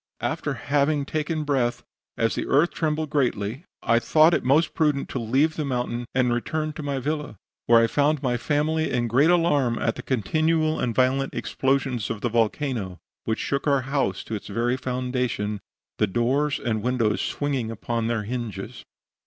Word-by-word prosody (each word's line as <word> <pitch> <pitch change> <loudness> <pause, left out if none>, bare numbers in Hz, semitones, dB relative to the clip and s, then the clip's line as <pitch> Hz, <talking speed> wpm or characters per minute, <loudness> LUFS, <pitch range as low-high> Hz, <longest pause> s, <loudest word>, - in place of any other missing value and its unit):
After - - -1
having 145 0 +1
taken 155 +1 -2
breath, 130 -5 0 0.3
as 115 0 +1
the - - -3
earth 150 +6 +3
trembled 155 -1 -1
greatly 125 - -1 0.2
I 115 0 +3
thought 155 +6 +4
it - - +1
most 150 +6 +3
prudent 150 -3 +1
to 130 - -3
leave 135 +8 +1
the 155 - -1
mountain 125 -3 -2
and 125 -2 +3
return 155 +6 -2
to 155 - -7
my 140 -2 -2
villa, 150 -4 -3 0.3
where 115 0 +7
I 115 - +5
found 145 +4 +1
my 125 -2 +1
family 155 +5 0
in 120 -1 0
great 135 +8 +4
alarm 145 -9 +3
at 115 - 0
the - - -7
continual 155 - +1
and 120 -3 -1
violent 130 +2 +1
explosions 135 -4 -1
of 110 -2 -4
the 120 - 0
volcano, 115 -4 -1 0.3
which 110 - 0
shook 140 +2 -2
our 140 -2 +3
house 135 -8 -1
to - - -7
its 105 - -5
very 120 +4 0
foundation, 125 -5 -2 0.4
the 105 - +3
doors 130 +8 +1
and 110 -2 -1
windows 120 -3 +1
swinging 135 -6 -2
upon 115 +1 -2
their 115 -2 -1
hinges. 110 -4 -5
130 Hz, 175 wpm, -24 LUFS, 115-150 Hz, 0.4 s, where